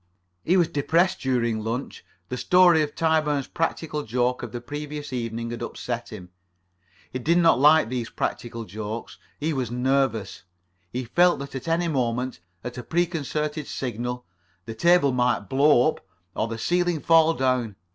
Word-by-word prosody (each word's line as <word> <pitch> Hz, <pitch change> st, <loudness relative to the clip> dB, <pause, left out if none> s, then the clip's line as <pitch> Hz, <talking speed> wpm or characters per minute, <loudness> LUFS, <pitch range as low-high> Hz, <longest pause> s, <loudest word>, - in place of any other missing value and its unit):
He 180 Hz, +3 st, +3 dB
was 175 Hz, -3 st, +4 dB
depressed 165 Hz, +6 st, +1 dB
during 120 Hz, -4 st, 0 dB
lunch. 115 Hz, +4 st, -4 dB, 0.3 s
The 125 Hz, -, -3 dB
story 175 Hz, +5 st, +5 dB
of 145 Hz, -1 st, -3 dB
Tyburn's 155 Hz, -4 st, +1 dB
practical 160 Hz, -2 st, -2 dB
joke 125 Hz, 0 st, -1 dB
of -, -, -6 dB
the 120 Hz, -, -5 dB
previous 145 Hz, +2 st, -6 dB
evening 115 Hz, -1 st, -3 dB
had 120 Hz, -, -6 dB
upset 120 Hz, 0 st, -5 dB
him. 90 Hz, -5 st, -9 dB, 0.8 s
He 130 Hz, -, -2 dB
did 165 Hz, +7 st, +2 dB
not 165 Hz, -6 st, +4 dB
like 150 Hz, -2 st, +6 dB
these 120 Hz, -2 st, -3 dB
practical 115 Hz, -1 st, -4 dB
jokes. 110 Hz, +3 st, -6 dB, 0.2 s
He 155 Hz, +2 st, -1 dB
was 130 Hz, -5 st, -2 dB
nervous. 125 Hz, -4 st, 0 dB, 0.5 s
He 125 Hz, +1 st, -3 dB
felt 175 Hz, +9 st, +3 dB
that 140 Hz, 0 st, -8 dB
at 135 Hz, +3 st, -6 dB
any 170 Hz, +1 st, +1 dB
moment, 125 Hz, -, -1 dB, 0.2 s
at 125 Hz, 0 st, -6 dB
a -, -, -6 dB
preconcerted 155 Hz, -3 st, -2 dB
signal, 125 Hz, 0 st, -4 dB, 0.4 s
the 115 Hz, -, -6 dB
table 170 Hz, +3 st, +4 dB
might 125 Hz, -3 st, +1 dB
blow 140 Hz, +2 st, +4 dB
up, -, -, -7 dB, 0.3 s
or -, -, 0 dB
the 115 Hz, 0 st, -5 dB
ceiling 175 Hz, +5 st, 0 dB
fall 165 Hz, +1 st, +4 dB
down. 125 Hz, -5 st, 0 dB
130 Hz, 160 wpm, -25 LUFS, 120-160 Hz, 0.8 s, like